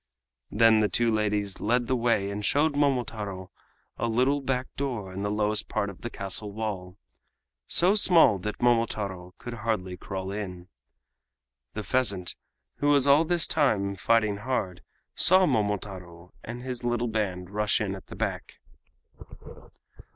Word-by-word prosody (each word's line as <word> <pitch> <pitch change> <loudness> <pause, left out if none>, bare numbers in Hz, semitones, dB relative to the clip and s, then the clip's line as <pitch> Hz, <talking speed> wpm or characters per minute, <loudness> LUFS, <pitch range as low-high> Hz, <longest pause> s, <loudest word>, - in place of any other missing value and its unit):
Then 110 0 +4
the 105 -1 +2
two 115 +3 +1
ladies 105 -2 -1
led 120 +3 +1
the 130 - 0
way 115 -5 +1
and 105 +1 -5
showed 145 +7 +2
Momotaro 115 -9 -1 0.5
a 115 - 0
little 130 +5 +1
back 130 -1 -1
door 120 -9 -4
in 95 - -5
the 105 - -1
lowest 105 0 0
part 100 - -1
of 95 - -16
the 120 - -5
castle 100 0 -3
wall—so 105 - -2
small 170 - +5
that 105 +4 -5
Momotaro 105 -6 0
could 120 - -8
hardly 105 -5 -3
crawl 95 0 -5
in. 95 -3 -6 1.1
The 105 - -4
pheasant, 100 -8 0 0.4
who 145 - -1
was 140 -2 +4
all 145 +3 +5
this 175 0 +2
time 105 -10 +1
fighting 110 0 +1
hard, 100 -6 -3 0.3
saw 185 +1 +6
Momotaro 95 - -3
and 120 +2 -7
his 125 -2 -5
little 120 0 0
band 95 -5 -3
rush 105 +1 +1
in 105 -3 -2
at 95 - -10
the - - -10
back. - - -4
110 Hz, 145 wpm, -27 LUFS, 100-125 Hz, 1.1 s, saw